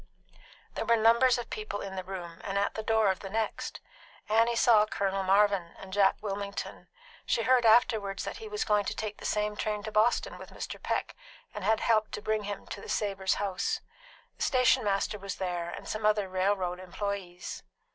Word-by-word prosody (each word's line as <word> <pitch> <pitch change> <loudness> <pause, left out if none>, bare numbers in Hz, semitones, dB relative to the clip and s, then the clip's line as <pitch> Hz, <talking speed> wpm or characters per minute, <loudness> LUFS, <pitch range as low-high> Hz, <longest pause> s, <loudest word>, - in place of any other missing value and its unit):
There - - -3
were 235 - +5
numbers 235 +3 +5
of 240 - -6
people 215 -1 -4
in 195 -1 -6
the 185 - -4
room 175 -3 -7
and 195 0 -2
at 200 - +1
the 220 - -4
door 220 -2 +3
of 190 - -4
the 195 - -7
next. 220 +1 -3 0.5
Annie 230 +2 +3
saw 220 -2 +5
Colonel 195 -2 -1
Marvin 195 -2 +2
and 190 -1 -10
Jack 195 -1 +4
Wilmington. 200 -1 -5 0.4
She 230 - +1
heard 250 -2 +4
afterward 220 -3 +4
that - - -4
he 445 - -8
was 420 0 -2
going 210 -2 +2
to - - -3
take 215 -1 -4
the - - -10
same 210 0 0
train 210 -1 -2
to 215 - -5
Boston 230 - +2
with - - -10
Mr. - - -7
Peck, - - -2 0.4
and 210 - -6
had 220 +2 +2
helped 215 -2 +2
to - - -4
bring 215 -1 0
him 205 0 -5
to - - -7
the - - -10
Savors' 195 -2 0
house. 195 -2 -1 0.6
The - - -15
stationmaster 210 -5 +2
was 200 0 -5
there, 175 -2 -3
and - - -8
some 215 0 -4
other 210 -2 +3
railroad 185 -1 0
employes. 185 -1 -5
205 Hz, 195 wpm, -29 LUFS, 195-220 Hz, 0.6 s, were